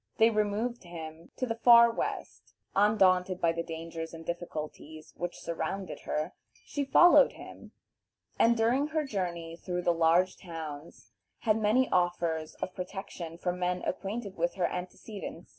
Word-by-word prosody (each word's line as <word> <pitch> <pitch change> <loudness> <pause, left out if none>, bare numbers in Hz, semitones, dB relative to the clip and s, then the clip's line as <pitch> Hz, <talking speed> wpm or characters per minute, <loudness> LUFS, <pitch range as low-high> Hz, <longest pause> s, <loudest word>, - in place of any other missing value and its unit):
They 225 +1 +5
removed 215 +3 -1
him 165 -1 -9
to 255 - -1
the 230 -1 -4
far 235 -1 +8
West. - - -5 0.2
Undaunted 190 -3 +3
by 165 -2 +3
the 165 0 -2
dangers 165 0 -6
and 165 0 -10
difficulties 155 -2 -6
which 175 0 -4
surrounded 170 +3 -4
her, 155 +4 -2 0.3
she 285 - -2
followed 350 - +7
him, - - -12 0.7
and 235 +1 +5
during 245 +6 +2
her 310 -1 -1
journey 175 -8 -3
through 180 +1 -4
the 175 - +3
large 170 +3 +3
towns 160 -3 -8 0.3
had 220 -2 +2
many 235 +5 +3
offers 170 -3 0
of 185 - -5
protection 180 -3 -7
from 180 +1 -2
men 180 0 -1
acquainted 200 +2 -4
with 170 +1 0
her 180 - +1
antecedents. 180 +1 -6
180 Hz, 145 wpm, -30 LUFS, 165-215 Hz, 0.7 s, far